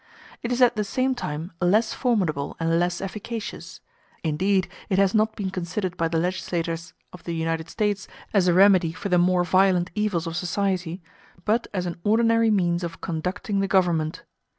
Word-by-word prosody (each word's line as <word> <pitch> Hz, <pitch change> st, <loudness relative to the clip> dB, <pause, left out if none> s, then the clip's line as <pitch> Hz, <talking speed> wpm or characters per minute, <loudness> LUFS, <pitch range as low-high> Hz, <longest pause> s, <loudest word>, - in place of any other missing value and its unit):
It 235 Hz, -, -3 dB
is 245 Hz, +1 st, +3 dB
at 240 Hz, -1 st, +4 dB
the 210 Hz, -, 0 dB
same 255 Hz, +6 st, 0 dB
time 160 Hz, -7 st, -5 dB
less 210 Hz, +6 st, +3 dB
formidable 185 Hz, -, 0 dB
and 165 Hz, 0 st, +2 dB
less 175 Hz, 0 st, 0 dB
efficacious; 215 Hz, +3 st, -6 dB, 0.4 s
indeed, 185 Hz, +4 st, +1 dB, 0.2 s
it 190 Hz, -, +1 dB
has 195 Hz, -1 st, +3 dB
not 220 Hz, 0 st, +2 dB
been 195 Hz, -2 st, -3 dB
considered 180 Hz, +1 st, -3 dB
by 165 Hz, -, 0 dB
the 165 Hz, 0 st, -1 dB
legislators 170 Hz, -1 st, -2 dB, 0.2 s
of 180 Hz, -2 st, -12 dB
the 170 Hz, -, -4 dB
United 165 Hz, 0 st, -2 dB
States 205 Hz, 0 st, -1 dB, 0.3 s
as 195 Hz, -3 st, +3 dB
a 175 Hz, -, +4 dB
remedy 185 Hz, -4 st, +5 dB
for 200 Hz, +4 st, -5 dB
the 180 Hz, -1 st, +4 dB
more 180 Hz, 0 st, +3 dB
violent 185 Hz, -1 st, +3 dB
evils 205 Hz, -5 st, 0 dB
of 165 Hz, 0 st, -4 dB
society, 180 Hz, -1 st, -2 dB, 0.4 s
but 225 Hz, +3 st, +1 dB
as 185 Hz, -3 st, -2 dB
an 175 Hz, -, -4 dB
ordinary 230 Hz, +1 st, +3 dB
means 175 Hz, -4 st, +1 dB
of 170 Hz, -1 st, -5 dB
conducting 185 Hz, +4 st, -2 dB
the 195 Hz, -, +1 dB
government. 170 Hz, -5 st, +1 dB
185 Hz, 175 wpm, -24 LUFS, 170-205 Hz, 0.4 s, remedy